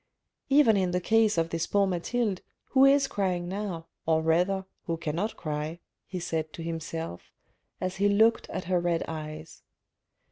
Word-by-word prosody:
Even 275 Hz, -7 st, +6 dB
in 185 Hz, -2 st, +1 dB
the 180 Hz, 0 st, 0 dB
case 220 Hz, +2 st, +3 dB
of 165 Hz, 0 st, +1 dB
this 165 Hz, 0 st, -1 dB
poor 200 Hz, -1 st, +3 dB
Mathilde, 195 Hz, +3 st, -1 dB, 0.3 s
who 265 Hz, 0 st, +6 dB
is 275 Hz, 0 st, +5 dB
crying 180 Hz, -5 st, -1 dB
now, 185 Hz, -3 st, -4 dB, 0.2 s
or 160 Hz, -1 st, +3 dB
rather, 180 Hz, +4 st, +2 dB, 0.2 s
who 165 Hz, -1 st, -1 dB
cannot 170 Hz, +7 st, -2 dB
cry," 155 Hz, +1 st, -4 dB, 0.3 s
he 185 Hz, -, -4 dB
said 160 Hz, -2 st, -2 dB
to 165 Hz, -, -7 dB
himself, 165 Hz, -, -5 dB, 0.5 s
as 185 Hz, +1 st, -3 dB
he 200 Hz, +1 st, +3 dB
looked 220 Hz, +3 st, +3 dB
at -, -, -4 dB
her 180 Hz, 0 st, +2 dB
red 170 Hz, -1 st, 0 dB
eyes. 155 Hz, 0 st, -7 dB
180 Hz, 165 wpm, -28 LUFS, 165-205 Hz, 0.5 s, Even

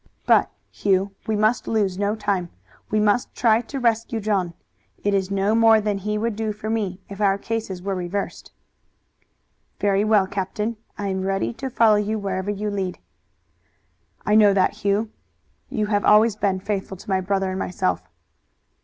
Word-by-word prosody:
But, -, -, +4 dB, 0.2 s
Hugh, 195 Hz, 0 st, +1 dB, 0.2 s
we 220 Hz, -, +1 dB
must 215 Hz, +3 st, +1 dB
lose 200 Hz, -4 st, 0 dB
no 205 Hz, +1 st, +1 dB
time. 200 Hz, -5 st, -1 dB, 0.4 s
We 215 Hz, -, +1 dB
must 210 Hz, +3 st, +1 dB
try 225 Hz, -1 st, +3 dB
to 270 Hz, +3 st, -6 dB
rescue 230 Hz, -1 st, 0 dB
John. 195 Hz, -5 st, -1 dB, 0.5 s
It 205 Hz, -, +1 dB
is 195 Hz, -1 st, +1 dB
no 200 Hz, +1 st, +1 dB
more 225 Hz, -1 st, +6 dB
than 205 Hz, -1 st, -1 dB
he 210 Hz, +2 st, -2 dB
would 225 Hz, 0 st, -1 dB
do 220 Hz, 0 st, -2 dB
for 215 Hz, +1 st, -5 dB
me 200 Hz, -5 st, -2 dB
if 200 Hz, +1 st, -8 dB
our 195 Hz, -1 st, +3 dB
cases 200 Hz, -4 st, -4 dB
were 195 Hz, 0 st, -1 dB
reversed." 185 Hz, +2 st, -4 dB, 1.3 s
"Very 200 Hz, 0 st, +2 dB
well, 210 Hz, -2 st, +4 dB
captain. 200 Hz, +4 st, -3 dB, 0.2 s
I 205 Hz, -1 st, -2 dB
am 190 Hz, 0 st, -2 dB
ready 195 Hz, +3 st, -1 dB
to 265 Hz, +3 st, -5 dB
follow 220 Hz, -4 st, +4 dB, 0.2 s
wherever 195 Hz, -1 st, -3 dB
you 205 Hz, +1 st, -2 dB
lead." 190 Hz, -3 st, -3 dB, 1.3 s
"I 210 Hz, -, +2 dB
know 210 Hz, -2 st, +6 dB
that, 200 Hz, +1 st, +2 dB
Hugh. 205 Hz, +2 st, +1 dB, 0.6 s
You 220 Hz, -6 st, -1 dB
have 205 Hz, -1 st, 0 dB
always 215 Hz, +1 st, +5 dB
been 195 Hz, -3 st, 0 dB
faithful 195 Hz, -1 st, -3 dB
to -, -, -15 dB
my 190 Hz, 0 st, +2 dB
brother 195 Hz, 0 st, 0 dB
and 185 Hz, -, -3 dB
myself." 90 Hz, -, -1 dB
205 Hz, 170 wpm, -23 LUFS, 195-215 Hz, 1.3 s, more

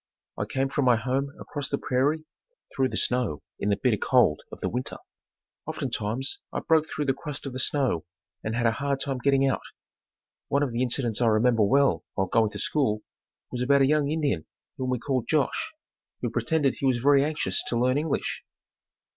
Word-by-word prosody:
I -, -, -2 dB
came 135 Hz, 0 st, 0 dB
from 135 Hz, 0 st, 0 dB
my 125 Hz, -1 st, +6 dB
home 130 Hz, +5 st, -1 dB
across 145 Hz, -3 st, -5 dB
the 140 Hz, -, 0 dB
prairie, 145 Hz, +6 st, 0 dB, 0.5 s
through 130 Hz, -1 st, +2 dB
the -, -, -3 dB
snow 125 Hz, -12 st, 0 dB, 0.2 s
in 100 Hz, -, 0 dB
the 100 Hz, -, +3 dB
bitter 120 Hz, -5 st, +2 dB
cold 120 Hz, -, +3 dB
of -, -, -9 dB
the -, -, -1 dB
winter. 125 Hz, +2 st, -3 dB, 0.7 s
Oftentimes 120 Hz, +7 st, -2 dB
I -, -, -2 dB
broke 160 Hz, -1 st, +3 dB
through 150 Hz, -, -3 dB
the 135 Hz, -, +2 dB
crust 145 Hz, +1 st, -6 dB
of 135 Hz, -, -5 dB
the 130 Hz, -, -3 dB
snow 130 Hz, -, +1 dB, 0.4 s
and 110 Hz, +1 st, -2 dB
had 120 Hz, 0 st, 0 dB
a 115 Hz, -, +5 dB
hard 140 Hz, +3 st, -1 dB
time 135 Hz, -2 st, -2 dB
getting 135 Hz, +1 st, +3 dB
out. 135 Hz, -, 0 dB, 0.9 s
One 140 Hz, +1 st, +2 dB
of 135 Hz, -, -1 dB
the 115 Hz, +1 st, -1 dB
incidents 120 Hz, -2 st, 0 dB
I 120 Hz, -, +4 dB
remember 115 Hz, +1 st, +3 dB
well 135 Hz, +7 st, +3 dB
while 95 Hz, -, +1 dB
going 110 Hz, +3 st, +2 dB
to -, -, -8 dB
school, 110 Hz, -8 st, 0 dB, 0.5 s
was 125 Hz, -, -3 dB
about 140 Hz, +2 st, +4 dB
a -, -, +6 dB
young 145 Hz, 0 st, +2 dB
Indian 145 Hz, -, -1 dB, 0.3 s
whom 130 Hz, -1 st, -3 dB
we 125 Hz, -, +1 dB
called 130 Hz, 0 st, -1 dB
Josh, 160 Hz, -, +1 dB, 0.5 s
who -, -, -1 dB
pretended 150 Hz, -5 st, +1 dB
he 135 Hz, -, +1 dB
was 130 Hz, -2 st, +3 dB
very 140 Hz, +3 st, +4 dB
anxious 150 Hz, 0 st, -1 dB
to 120 Hz, -, 0 dB
learn 130 Hz, +3 st, +2 dB
English. 155 Hz, -1 st, -2 dB
130 Hz, 195 wpm, -27 LUFS, 120-140 Hz, 0.9 s, my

